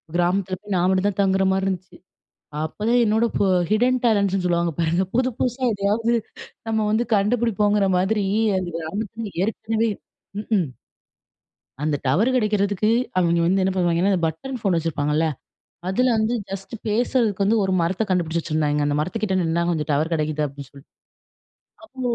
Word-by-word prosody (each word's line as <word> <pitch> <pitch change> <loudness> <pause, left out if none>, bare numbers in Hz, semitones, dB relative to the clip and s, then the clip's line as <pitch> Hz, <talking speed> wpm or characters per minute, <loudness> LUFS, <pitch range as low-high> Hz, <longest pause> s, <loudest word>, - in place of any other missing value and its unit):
கிராமத்தில 185 +2 +1
போய் 205 -2 -3
நான் 180 0 +2
மட்டும் 190 +1 +2
தான் 200 - -7
தங்குறமாரி 190 0 +2
இருந்துச்சு. 185 -1 -4 0.7
அப்ப 160 - -7
தான் 245 +1 +4
என்னோட 220 +2 +2 0.5
ஹிட்டன் 250 +4 +3
டேலண்ட்ஸ்ன்னு 200 -4 +2
சொல்லுவாங்க 170 -1 +1
பாருங்க! 170 +2 +1
புது, 255 +1 +2
புதுசா 255 +1 -1
எதையாவது 210 +3 0 0.6
நம்ம 220 0 0
வந்து 225 +3 +2
கண்டுபிடிப்போங்கிற 210 -1 +2
மாதிரி 200 +2 +1 0.3
அந்த 185 -2 -2
கிராமத்தில 205 +5 -5
ஏற்கனவே 225 +2 -1 0.5
ம்ஹ்ம். 205 -6 0 1.2
அந்த 150 -1 +1
டவர் 195 - +3
கிடைக்கிறதுக்கு 210 -2 +1 0.3
அவெங்க 170 -1 +3
வந்து 190 +2 +2
என்ன 190 - +1
பண்ணுவாங்கன்னா, 175 +1 +2
அந்த 175 - 0
பட்டன் 255 - -5
ஃபோன் 195 -5 +1
வச்சிருப்பாங்கல்ல, 155 -1 0 0.6
அதில 250 +7 +2
வந்து 220 +2 +1 0.2
ஜஸ்ட்டு 195 +3 -6
பேசுறதுக்கு 220 -2 +1
வந்து 225 +2 +3
ஒரு 190 - -1
மரத்த 185 +6 0
கண்டுபிடிச்சி 170 -2 0
வச்சிருந்தாங்க. 150 -2 0
அந்த 145 - 0
மரத்துக்கிட்ட 190 +4 -1
நின்னா, 165 +1 0
கொஞ்சம் 155 -2 -2
டவர் 155 +4 0
கிடைக்குது 155 -1 -1
அப்பிடின்னு 140 -1 -11
சொல் 140 -1 -16 1.0
அப்போ, 260 -5 -12
190 Hz, 145 wpm, -22 LUFS, 170-220 Hz, 1.2 s, தான்